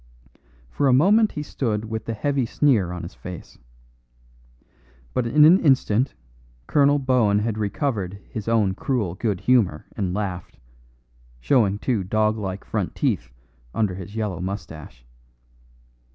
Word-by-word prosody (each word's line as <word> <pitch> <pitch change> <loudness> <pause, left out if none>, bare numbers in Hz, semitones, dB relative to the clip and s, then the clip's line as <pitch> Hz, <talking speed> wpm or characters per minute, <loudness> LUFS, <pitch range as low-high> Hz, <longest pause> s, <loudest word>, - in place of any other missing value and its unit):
For 140 - +1
a 130 - +4
moment 205 - +4
he 150 - -4
stood 110 -7 -2
with 110 0 -5
the 115 - -3
heavy 140 +1 0
sneer 115 - +2
on 90 -1 -6
his 85 - -8
face. 90 -2 -10 1.5
But 125 -2 0
in 150 +5 +6
an 175 +5 +7
instant 130 -3 +2 0.5
Colonel 145 - +3
Bohun 125 -7 +2
had 110 +1 -1
recovered 100 - -2
his 110 -2 -7
own 110 -4 +2
cruel 105 -4 -2
good 100 -1 -2
humour 110 -12 +2
and 95 -4 -2
laughed, 95 -3 -4 0.8
showing 105 - +2
two 110 -2 -1
dog 110 +3 +1
like 100 -3 -5
front - - -3
teeth - - -1 0.5
under 105 -4 +1
his 95 +3 -9
yellow 105 -6 -2
moustache. 80 -10 -7
110 Hz, 135 wpm, -23 LUFS, 95-130 Hz, 1.5 s, an